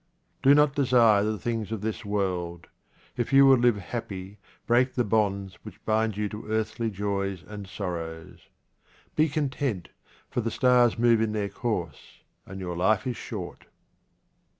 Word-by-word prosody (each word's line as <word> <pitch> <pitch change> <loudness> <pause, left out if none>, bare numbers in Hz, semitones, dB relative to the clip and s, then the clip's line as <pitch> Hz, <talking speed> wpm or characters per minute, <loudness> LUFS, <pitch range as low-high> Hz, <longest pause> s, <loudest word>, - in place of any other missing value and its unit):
Do 140 +1 +6
not 150 -1 +4
desire 120 -7 +4
the 110 0 -1
things 115 -1 -3
of 110 -3 -3
this 110 +2 -3
world. 90 -5 -2 0.5
If 120 - -2
you 135 0 +7
would 135 -2 +6
live 120 -3 +3
happy, 100 0 -6 0.3
break 125 +2 +2
the 125 - +2
bonds 100 -4 0
which - - -13
bind 110 -1 +1
you 105 0 0
to 105 +1 -8
earthly 110 +1 -1
joys 100 -2 -3
and 105 -2 -8
sorrows. 85 -4 -6 0.7
Be 155 +1 +3
content, 135 - -2 0.4
for 120 - -2
the 115 - -2
stars 125 -1 +3
move 115 -1 +4
in 110 -1 0
their 105 -2 -1
course, 100 -11 -5 0.3
and 95 +1 -8
your 90 -2 -4
life 95 +7 +2
is 125 -2 -2
short. - - -7
110 Hz, 155 wpm, -27 LUFS, 100-120 Hz, 0.7 s, you